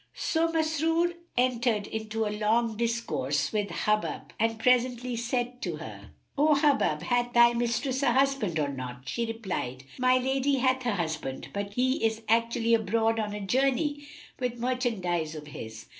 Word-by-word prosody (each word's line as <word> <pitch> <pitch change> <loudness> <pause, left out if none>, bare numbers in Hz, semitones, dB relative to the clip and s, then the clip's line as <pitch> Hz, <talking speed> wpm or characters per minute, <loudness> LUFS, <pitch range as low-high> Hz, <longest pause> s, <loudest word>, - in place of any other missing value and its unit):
So 330 0 0
Masrur 325 +2 +1 0.2
entered 240 -4 +1
into 220 0 -3
a 210 - -2
long 220 +2 +1
discourse 230 - -1
with 205 -2 0
Hubub 215 0 -1
and 225 0 +1
presently 250 +1 +2
said 245 +1 -2
to 175 -4 -2
her, 105 -10 -9 0.3
"O 300 +1 +4
Hubub, 285 -1 +2
hath 245 0 0
thy 235 0 +6
mistress 240 +3 -1
a 275 - +3
husband 265 -9 +1
or 145 -2 0
not?" 125 -2 -7
She 235 +9 -2
replied, 185 - -4 0.2
"My 255 0 +4
lady 265 +2 +1
hath 260 -1 +1
a 225 - +1
husband; 160 -6 -3
but 200 0 -4
he 260 0 +1
is 225 0 0
actually 230 +1 +2
abroad 225 +1 +2
on 210 -1 -2
a 210 - -5
journey 275 +5 +1 0.3
with 250 -2 -2
merchandise 215 -11 -1
of 150 -1 -8
his." 110 -6 -9
230 Hz, 160 wpm, -28 LUFS, 205-255 Hz, 0.3 s, thy